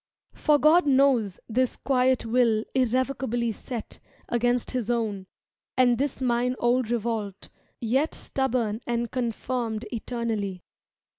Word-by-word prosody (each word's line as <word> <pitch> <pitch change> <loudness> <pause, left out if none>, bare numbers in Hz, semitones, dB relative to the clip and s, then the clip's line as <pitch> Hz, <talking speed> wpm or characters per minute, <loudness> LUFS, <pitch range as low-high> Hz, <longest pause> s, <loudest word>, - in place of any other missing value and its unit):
For 300 -1 +3
God 310 +3 +5
knows 260 -8 +3
This 255 +2 0
quiet 260 -2 +2
will 230 -2 +2
irrevocably 255 -2 0
set 230 +2 -7 0.3
Against 240 0 +1
His 245 -4 -2
own, 215 -5 -1 0.5
and 245 -2 +4
this 280 -2 -1
mine 250 0 +1
old 240 -1 +1
revolt. 220 -4 -3 0.3
Yet 265 +7 0
stubborn 240 -5 -1
and 235 -1 -1
confirmed 235 -2 -2
eternally. 220 -6 -3
240 Hz, 115 wpm, -26 LUFS, 225-255 Hz, 0.5 s, God